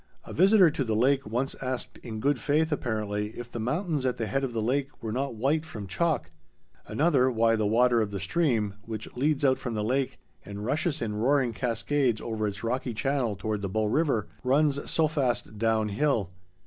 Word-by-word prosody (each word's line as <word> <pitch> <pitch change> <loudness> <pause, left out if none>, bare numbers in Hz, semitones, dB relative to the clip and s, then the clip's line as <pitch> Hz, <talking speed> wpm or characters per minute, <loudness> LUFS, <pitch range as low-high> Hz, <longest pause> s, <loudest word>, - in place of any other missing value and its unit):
A - - -8
visitor 190 -1 +6
to 140 - -1
the 110 -3 -1
lake 135 +3 +2
once 125 +5 -1
asked 130 -2 -4
in 110 -2 -6
good 140 +2 +1
faith, 150 +5 +1
apparently, 105 -6 -2
if 120 0 -7
the 120 - -5
mountains 150 - -1
at 130 -1 0
the 115 - -2
head 135 +5 -1
of 135 - -1
the 115 -1 -2
lake 135 +4 0
were 110 - -4
not 135 +2 -2
white 140 +8 +1
from 115 -11 -7
chalk; 100 - -1 0.6
another, 140 -5 +3
why 115 -2 +3
the 110 -1 +1
water 120 +2 +4
of 105 - -1
the 100 -1 -4
stream—which 110 - -2
leads 145 +2 +1
out 130 -1 +3
from 120 -3 -4
the 105 - -1
lake 130 +4 0 0.3
and 100 +1 -7
rushes 155 +2 0
in 105 -2 -2
roaring 130 +1 +2
cascades 115 +3 0
over 110 -2 -2
its 100 +1 -5
rocky 120 0 -2
channel 130 -3 0
toward 105 +1 -3
the 100 - -3
Bow 110 +3 0
River—runs 135 - +1
so 160 -1 +3
fast 130 -8 -1
down 110 -1 +2
hill. 105 - 0
120 Hz, 195 wpm, -28 LUFS, 110-140 Hz, 0.6 s, visitor